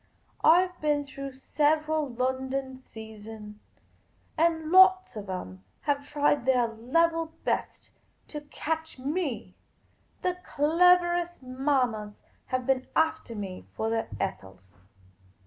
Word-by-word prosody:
I 350 +3 +7
've 360 -1 -13
been 295 -1 +1
through 275 0 -7
several 305 +2 +1
London 260 +1 -2
seasons, 220 -2 -11 0.6
and 320 -1 +1
lots 375 -5 +6
of 205 -2 -7
'em 95 - -6 0.2
have 285 0 -1
tried 290 -2 +2
their 250 -2 +4
level 325 +8 0
best - - -2 0.4
to 295 - -6
catch 320 +2 -4
me; 270 - -3 0.7
the 360 0 0
cleverest 345 +2 +3
mammas 255 -5 -1 0.2
have 255 -1 -1
been 260 -1 +1
aftali 320 -7 +1
me 190 -3 -6
for 220 0 -1
their 225 0 -1
Ethels. 95 - -5
275 Hz, 110 wpm, -28 LUFS, 225-320 Hz, 0.7 s, I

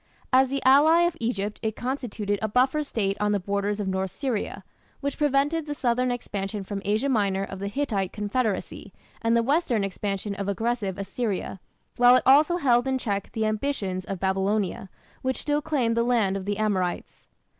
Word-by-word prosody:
As 265 +1 +6
the 275 +1 -3
ally 300 +6 +6
of 345 -1 +2
Egypt 210 -3 -2
it 220 -1 -2
constituted 230 -6 -3
a 220 - 0
buffer 260 +7 +2
state 205 -9 -1
on 210 0 +1
the 205 - +1
borders 200 +2 -2
of 205 - -2
North 190 0 -1
Syria, 220 -5 -3 0.4
which 280 -1 -3
prevented 295 +2 +1
the 295 - -3
southern 250 -1 +1
expansion 205 -4 -3
from 200 +1 -5
Asia 215 +6 +1
Minor 200 -6 +1
of 195 -1 -7
the 200 - -3
Hittite 205 -5 -1
confederacy 210 +1 -2 0.3
and 230 0 +2
the 230 - +2
western 265 - +1
expansion 195 +1 -3
of 200 0 -4
aggressive 205 -1 -1
Assyria, 200 -1 -3 0.4
while 245 0 +7
it - - +3
also 300 +6 +5
held 245 -5 +3
in 265 0 +1
check 200 -5 -3
the 220 -1 0
ambitions 215 -5 -2
of 195 -2 -5
Babylonia, 195 +1 -1 0.3
which 260 0 -1
still 295 0 0
claimed 265 -7 0
the 235 - +2
"land 230 -5 +2
of 195 -1 -4
the 205 0 -2
Amorites". 195 -5 -2
220 Hz, 180 wpm, -26 LUFS, 200-260 Hz, 0.4 s, while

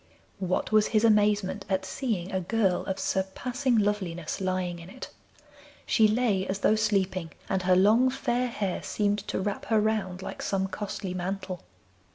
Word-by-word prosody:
What 185 +2 -1
was 215 -1 +5
his 215 -1 +2
amazement 210 -2 +3
at 190 -1 0
seeing 195 -4 -2
a 190 - 0
girl 190 0 +1
of 190 -1 -2
surpassing 245 +8 -1
loveliness 195 -6 -1
lying 185 -2 -1
in 170 +1 -11
it! 255 - -9 0.7
She 220 - +4
lay 215 -4 +1
as 190 - -1
though - - +4
sleeping, 190 -6 0
and 190 - 0
her 180 0 +3
long, 220 +7 +5
fair 250 -2 0
hair 200 -6 -2
seemed 205 0 0
to - - -2
wrap 200 +1 -3
her 220 -2 +3
round 205 -4 -1
like - - -6
some 190 -1 0
costly 195 -1 -4
mantle. 185 0 -4
195 Hz, 165 wpm, -28 LUFS, 185-215 Hz, 0.7 s, was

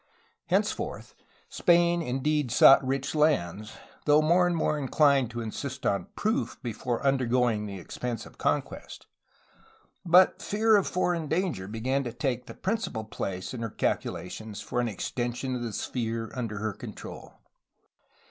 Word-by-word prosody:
Henceforth - - -1 0.3
Spain 170 0 +3
indeed 145 0 0
sought 135 +4 +7
rich 135 +1 -2
lands, 110 - +1 0.3
though 150 0 +6
more 175 +3 +4
and 175 - 0
more 155 -2 0
inclined 140 -2 +3
to 120 0 -5
insist 130 +5 -5
on 100 - 0
proof 220 +6 -1
before 120 +2 -3
undergoing 125 -5 +2
the 100 -1 -6
expense 115 +6 -5
of - - -16
conquest, - - -2 1.0
but 180 +1 +5
fear 220 +1 +3
of 200 - +3
foreign 175 -3 0
danger 160 - -1
began 125 +6 -1
to 120 - -4
take 125 -1 -2
the - - -9
principal 205 - -2
place 95 -3 -5
in 120 - -5
her 115 - -2
calculations 105 +1 -3
for 120 - -2
an 120 - 0
extension 120 +4 -3
of 125 - -4
the 120 -2 -3
sphere 115 0 -3
under 115 -5 -4
her 110 0 -2
control. - - -9
130 Hz, 145 wpm, -28 LUFS, 115-155 Hz, 1.0 s, sought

